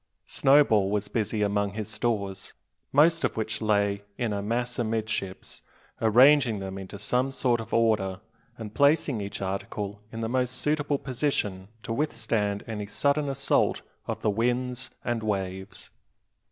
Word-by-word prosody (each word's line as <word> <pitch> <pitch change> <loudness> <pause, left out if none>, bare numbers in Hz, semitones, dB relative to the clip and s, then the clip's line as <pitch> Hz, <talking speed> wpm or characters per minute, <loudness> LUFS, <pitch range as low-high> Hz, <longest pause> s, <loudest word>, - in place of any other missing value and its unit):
Snowball 135 -8 +4
was 105 0 -1
busy 110 -1 0
among 100 -1 0
his 110 -1 -4
stores, 105 -3 -2 0.4
most 165 +4 +4
of - - 0
which 110 - -2
lay 100 -2 +1 0.2
in 115 -4 -1
a 100 - -2
mass 120 +4 -2
amidships, 110 -4 -3 0.4
arranging 125 +1 +5
them 95 0 -5
into 95 +1 -8
some 125 +6 0
sort 125 -3 +1
of 115 - -10
order, 105 -5 +2 0.4
and 110 -2 -7
placing 140 -3 +3
each 100 0 -5
article 100 +2 -4
in 115 - -5
the 115 - -1
most 125 +1 0
suitable 145 +1 0
position 120 -9 -2 0.2
to 115 - -3
withstand 110 -7 -1
any 105 -3 -5
sudden 140 +6 +1
assault 135 0 +1 0.2
of - - -4
the 105 - +3
winds 125 +3 -1 0.2
and 120 -2 -1
waves. 95 -2 -4
110 Hz, 145 wpm, -27 LUFS, 100-125 Hz, 0.4 s, arranging